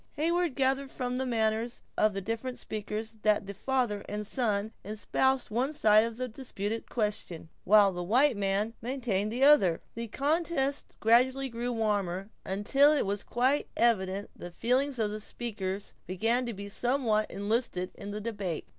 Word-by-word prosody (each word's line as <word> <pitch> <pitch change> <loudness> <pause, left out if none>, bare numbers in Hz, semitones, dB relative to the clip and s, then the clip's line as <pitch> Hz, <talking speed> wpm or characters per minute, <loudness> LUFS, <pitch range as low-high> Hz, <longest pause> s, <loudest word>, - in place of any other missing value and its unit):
Heyward 335 0 0
gathered 270 0 +1
from 250 -1 -3
the 265 - -1
manners 225 0 0
of 215 -2 +2
the 195 - -2
different 230 +5 -4
speakers, 215 +1 -5
that 210 -1 +2
the 200 - -6
father 235 -2 -1
and 210 0 -3
son 215 -3 -1
espoused 240 +5 0
one 255 +7 0
side 215 -6 +5
of 230 +1 -4
a 255 - -1
disputed 225 -3 -5
question, 210 -7 -3 0.2
while 205 0 +6
the 175 -1 -5
white 250 +9 +3
man 200 +2 0
maintained 225 -5 -1
the 250 +4 0
other. 200 - +6
The 230 0 -5
contest 285 +2 0
gradually 255 +4 +4
grew 240 +1 -3
warmer, 205 -4 -1
until 270 +10 +3
it 300 -6 +2
was 200 +1 -2
quite 260 +4 +1
evident 200 -4 +1
the 175 - -8
feelings 255 +8 0
of 215 -2 0
the 215 - -4
speakers 200 -3 -4
began 225 +7 +1
to 235 - -3
be 200 +1 -7
somewhat 230 -1 0
enlisted 200 -2 -1
in 200 - -8
the 210 +1 -4
debate. 200 -7 -4
225 Hz, 165 wpm, -29 LUFS, 205-255 Hz, 0.2 s, while